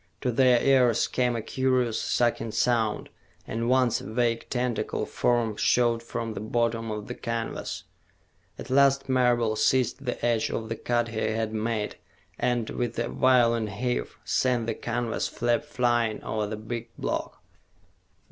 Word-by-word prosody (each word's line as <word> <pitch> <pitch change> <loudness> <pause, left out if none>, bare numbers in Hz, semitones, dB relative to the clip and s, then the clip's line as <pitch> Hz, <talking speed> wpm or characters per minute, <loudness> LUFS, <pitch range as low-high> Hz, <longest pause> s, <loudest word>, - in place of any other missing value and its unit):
To 125 - 0
their 125 0 +4
ears 125 -4 +4
came 125 -1 0
a 115 - -3
curious, 130 -3 0
sucking 120 -2 0
sound, 115 -3 +1 0.4
and 115 +1 -2
once 130 -2 +3
a - - -8
vague 115 0 0
tentacle 125 -2 -1
form 120 -3 0
showed 120 -1 +2
from 115 -1 -4
the - - -5
bottom 115 +1 -1
of 105 -1 -4
the 125 - -4
canvas. 115 -2 -4 0.7
At - - -8
last 140 0 +4
Marable 120 -4 +2
seized 130 +5 +1
the 125 -2 -3
edge 115 -2 +1
of 110 -1 -4
the 115 - -2
cut 120 +1 0
he 110 -1 -4
had 110 0 -1
made 110 -1 -2 0.4
and, 120 -2 0
with 120 -2 -3
a 120 0 -1
violent 115 -4 +3
heave, 120 +4 -3
sent 125 -3 +1
the 115 - -1
canvas 120 -1 -2
flap 120 +4 0
flying 120 -5 0
over 110 -1 -2
the 105 +1 -4
big 115 +2 -6
block. - - -3
120 Hz, 155 wpm, -27 LUFS, 115-125 Hz, 0.7 s, their